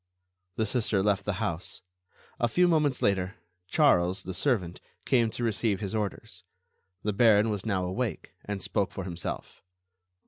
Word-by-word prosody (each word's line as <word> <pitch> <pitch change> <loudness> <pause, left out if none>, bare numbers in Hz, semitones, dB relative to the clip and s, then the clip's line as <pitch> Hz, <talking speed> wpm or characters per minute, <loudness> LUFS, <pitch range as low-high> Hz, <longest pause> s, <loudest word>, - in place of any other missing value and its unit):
The 110 - 0
Sister 110 -3 +1
left 100 -1 +1
the 105 - 0
house. 85 -1 -3 0.6
A 120 - +3
few 180 +8 +3
moments 150 -6 +2
later, 95 0 +1 0.3
Charles, 95 - +3
the 95 - -5
servant, 95 -4 0 0.2
came 120 -4 +3
to 120 - -5
receive 110 -3 +1
his 100 -2 -4
orders. 105 -3 -4 0.6
The 105 - 0
Baron 110 0 +5
was 105 +1 -3
now 95 -4 0
awake, 95 -1 -3
and 100 -2 -4
spoke 100 -3 0
for 95 - -5
himself. 90 -2 -5
105 Hz, 150 wpm, -28 LUFS, 95-115 Hz, 0.6 s, Baron